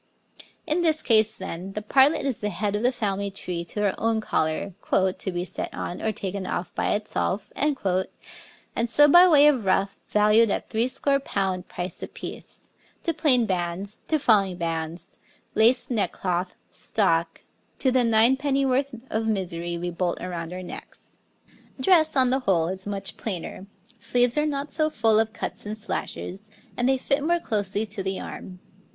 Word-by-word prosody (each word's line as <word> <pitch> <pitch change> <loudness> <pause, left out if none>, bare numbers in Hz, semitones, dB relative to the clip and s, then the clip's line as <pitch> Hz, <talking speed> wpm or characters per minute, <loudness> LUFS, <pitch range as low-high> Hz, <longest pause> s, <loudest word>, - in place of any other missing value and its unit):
In 325 +2 +1
this 315 -2 +2
case, 220 -1 +3
then, 190 -1 -6
the 210 - -4
partlet 275 +7 +4
is 270 -4 -2
head 205 0 -1
of 205 - -1
the 245 +2 +3
family 200 -5 -2
tree 180 -3 -4
to 210 +4 -2
our 195 - +2
own 225 0 +1
collar, 160 -1 -1 0.2
'to 190 0 +1
be 175 0 -3
set - - -4
on 175 - -5
or 220 - 0
taken 195 -2 -4
off 180 - -3
by - - +1
itself,' 205 -1 -2
and 230 -2 -3
so 295 +5 +6
by 350 +5 +8
way 295 -4 +7
of 280 -6 +4
ruff, 195 +1 +1
valued 210 +2 +4
at - - -3
threescore 255 +5 +1
pound 190 -8 -2
price 175 -1 -5
apiece, - - -7 0.3
to 335 - 0
plain 255 -7 +3
bands, 185 +2 -3
to 315 - +2
falling 200 -9 +3
bands, 165 0 -4 0.3
laced 245 +4 +3
neckcloth, 185 -5 -1 0.2
stock 165 -5 0 0.3
to 260 - +2
the 255 -1 +3
nine 230 +2 +5
pennyworth 275 -1 +1 0.2
of 220 0 -1
misery 175 -5 -2
we 175 +1 -3
bolt 175 0 -1
around 170 -2 -5
our 185 0 -6
necks. - - -11 0.6
Dress, 315 +1 +4
on 255 -2 +3
the 265 - +2
whole, 175 -9 +1
is 190 +1 -6
much 200 -1 -4
plainer, 190 -1 -5 0.3
sleeves 245 +2 +2
are 300 0 +2
not 285 0 -3
so 310 -1 +1
full 220 -5 +3
of 220 0 +1
cuts - - -4
and 215 +1 -2
slashes, 210 -1 -4 0.3
and 245 +1 +1
they 265 - +3
fit 275 +2 0
more 345 +2 +2
closely 205 - -2
to 205 -2 -5
the 190 0 -2
arm. 185 - -8
210 Hz, 170 wpm, -25 LUFS, 185-255 Hz, 0.6 s, by